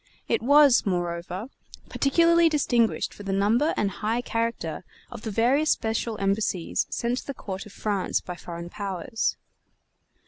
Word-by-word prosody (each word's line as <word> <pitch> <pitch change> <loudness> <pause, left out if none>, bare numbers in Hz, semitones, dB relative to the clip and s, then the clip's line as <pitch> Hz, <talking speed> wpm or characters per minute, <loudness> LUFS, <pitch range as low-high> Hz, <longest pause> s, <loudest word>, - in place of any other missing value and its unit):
It - - +1
was, 285 +1 +6
moreover, 175 +3 -3 0.4
particularly 335 +4 +4
distinguished 245 -7 +1
for - - -12
the 195 -1 -4
number 215 +10 +2
and 200 -1 +1
high 220 +5 -1
character 230 -10 -3 0.3
of 240 -3 -8
the 220 - -4
various 250 +8 +2
special 220 0 0
embassies 195 -3 0
sent 240 +2 -1
to - - -12
the 275 - -4
court 190 -2 -6
of - - -14
France 200 -2 -1
by 180 - -7
foreign 170 0 -8
powers. 200 +2 -2
220 Hz, 145 wpm, -26 LUFS, 195-245 Hz, 0.4 s, was